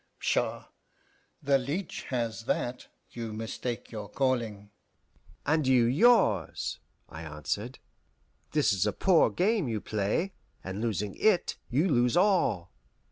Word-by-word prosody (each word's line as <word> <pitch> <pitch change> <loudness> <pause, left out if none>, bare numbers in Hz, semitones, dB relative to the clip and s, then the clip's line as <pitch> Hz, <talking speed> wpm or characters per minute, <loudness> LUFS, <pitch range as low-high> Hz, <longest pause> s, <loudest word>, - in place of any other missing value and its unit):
Pshaw! - - -1 0.8
the 140 -1 +3
leech 155 +8 -4
has 115 -3 -3
that. 125 0 -2 0.2
You 115 -2 -5
mistake 115 +2 -5
your 105 -3 -6
calling." 115 -6 -1 0.7
"And 150 -1 +2
you 125 -3 +5
yours," 125 - +3 0.3
I 80 - -9
answered. 85 - -4 0.8
"This 150 -9 +3
is 95 +2 +1
a 105 - 0
poor 180 - +4
game 195 - +1
you 110 -2 -1
play, 105 - -1 0.3
and 95 +3 -5
losing 105 -3 -1
it 215 -5 +2
you 145 +9 +2
lose 125 -4 +2
all. 175 - +2
120 Hz, 125 wpm, -29 LUFS, 105-150 Hz, 0.8 s, you